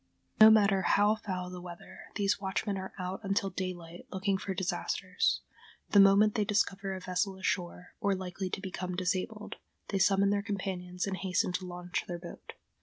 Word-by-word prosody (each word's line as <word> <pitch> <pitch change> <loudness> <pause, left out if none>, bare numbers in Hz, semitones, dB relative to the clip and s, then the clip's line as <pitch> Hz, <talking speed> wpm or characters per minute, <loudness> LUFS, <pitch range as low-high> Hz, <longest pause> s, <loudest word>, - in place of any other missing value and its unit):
No 215 0 +11
matter 200 -3 +5
how 205 +2 +4
foul 185 -4 -4
the 180 -1 -7
weather, 175 -1 -10 0.2
these 200 -1 +1
watchmen 195 +1 -1
are 190 0 -5
out 185 +1 -4
until 195 -1 0
daylight 175 -2 -6
looking 195 +1 0
for 190 0 -4
disasters. 180 +1 0 0.5
The 205 - +6
moment 200 +2 +6
they 215 - +1
discover 195 -1 0
a - - -5
vessel 185 +1 -1
ashore, 180 -2 -3
or 200 -4 +1
likely 185 0 -4
to 190 - -4
become 185 -1 -4
disabled, 185 +4 -2 0.3
they 195 - 0
summon 195 +1 +4
their 205 0 +1
companions 185 -3 -3
and 195 -1 -3
hasten 185 -1 0
to 185 0 -3
launch 180 0 -4
their 175 - -4
boat. 170 0 -10
190 Hz, 175 wpm, -31 LUFS, 180-200 Hz, 0.5 s, No